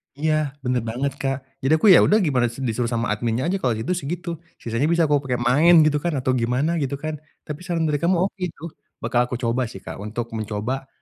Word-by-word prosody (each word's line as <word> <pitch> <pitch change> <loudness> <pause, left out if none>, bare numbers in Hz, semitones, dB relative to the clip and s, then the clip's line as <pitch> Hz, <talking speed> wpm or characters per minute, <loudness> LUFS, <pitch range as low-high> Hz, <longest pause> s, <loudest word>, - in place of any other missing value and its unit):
Iya 155 -1 0
bener 125 -1 0
banget, 130 +5 -1
Kak, 135 -1 0 0.2
jadi 135 +4 +2
aku 160 - +2
ya - - +8
udah 210 - +4
gimana 130 -5 +2
disuruh 120 -1 -2
sama 115 -2 0
adminnya 115 +3 -1
aja 195 - 0
kalau 125 - +1
gitu 115 +11 -3
segitu 175 +3 -4 0.3
sisanya 115 +5 -1
bisa 170 0 +3
aku 145 -1 +3
pake 125 -2 0
main 155 +7 +5
gitu 150 -1 +2
kan 175 -1 0
atau 130 0 0
gimana 125 +7 +1
gitu 140 0 -1
kan, 155 0 -2 0.3
tapi 150 0 -6
saran 170 -2 -1
dari 145 -1 0
kamu 175 +2 +3
oke 195 - -7
itu, 155 - -16 0.4
bakal 120 - +1
aku 125 - -4
coba 115 +2 +1
sih, 95 - -10
Kak, - - -7
untuk 115 +2 -5
mencoba, 110 +5 -3
135 Hz, 220 wpm, -23 LUFS, 120-155 Hz, 0.4 s, ya